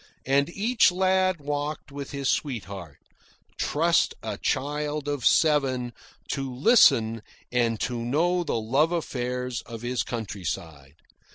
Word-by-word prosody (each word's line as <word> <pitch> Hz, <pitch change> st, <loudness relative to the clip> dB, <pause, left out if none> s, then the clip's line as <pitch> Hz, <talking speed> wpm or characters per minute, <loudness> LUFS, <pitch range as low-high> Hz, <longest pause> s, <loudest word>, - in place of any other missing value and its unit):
And 140 Hz, +2 st, +2 dB
each 215 Hz, +3 st, +3 dB
lad 185 Hz, -1 st, +2 dB
walked 145 Hz, +1 st, -4 dB
with 140 Hz, -1 st, -6 dB
his 140 Hz, -1 st, -3 dB
sweetheart 100 Hz, -, -3 dB, 0.6 s
trust 165 Hz, +2 st, +2 dB
a -, -, -4 dB
child 150 Hz, +1 st, -2 dB
of 145 Hz, -3 st, -2 dB
seven 135 Hz, -6 st, +2 dB, 0.4 s
to 135 Hz, -2 st, -3 dB
listen 125 Hz, -, +4 dB, 0.3 s
and 115 Hz, -3 st, +1 dB
to 120 Hz, -1 st, -2 dB
know 170 Hz, +8 st, +1 dB
the 115 Hz, -, -1 dB
love 135 Hz, +9 st, +2 dB
affairs 125 Hz, -6 st, -3 dB
of 115 Hz, -1 st, -8 dB
his 125 Hz, 0 st, -1 dB
countryside. 85 Hz, -, -5 dB
135 Hz, 120 wpm, -26 LUFS, 120-155 Hz, 0.6 s, listen